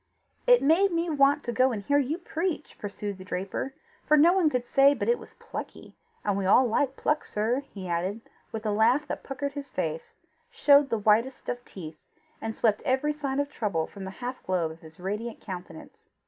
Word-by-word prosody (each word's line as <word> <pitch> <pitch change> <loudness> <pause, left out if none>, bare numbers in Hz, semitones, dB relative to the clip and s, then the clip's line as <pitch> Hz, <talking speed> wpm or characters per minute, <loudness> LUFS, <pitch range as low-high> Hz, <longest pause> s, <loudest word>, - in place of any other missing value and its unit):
"It - - +6
made 350 +7 +4
me 335 0 0
want 285 0 +4
to 240 - -2
go 255 +2 +3
and 210 -4 -4
hear 285 +6 +3
you 290 +4 -1
preach," 340 -2 -3
pursued 205 -1 -5
the - - -8
draper; 190 +9 -4 0.3
"for 305 - +4
no 330 +4 +6
one 370 -5 +3
could 250 -4 -1
say 275 +3 +5
but - - -3
it 475 0 +3
was - - -14
plucky - - -8 0.3
and 205 -1 +1
we 195 -1 -1
all 250 +6 +6
like 265 +3 +1
pluck, 300 0 0
sir," 225 +5 0
he 190 -3 -7
added, 180 +6 -2 0.3
with 220 0 -5
a 210 - +1
laugh 225 +8 +3
that - - -4
puckered 275 +1 -4
his 280 -1 -6
face, 470 -1 -4 0.3
showed 290 - +5
the 230 - +1
whitest 220 +5 +2
of 245 0 -3
teeth, 155 -4 -9 0.4
and 225 0 -4
swept 215 -2 +2
every 265 +3 +1
sign 280 -2 -2
of 285 0 -1
trouble 200 - -1
from 195 -2 -9
the - - -5 0.2
half 255 +1 -4
globe 175 -4 -1
of 160 - -12
his 160 +2 -15
radiant 210 +5 -4
countenance. 180 -4 -9
250 Hz, 205 wpm, -27 LUFS, 200-290 Hz, 0.4 s, It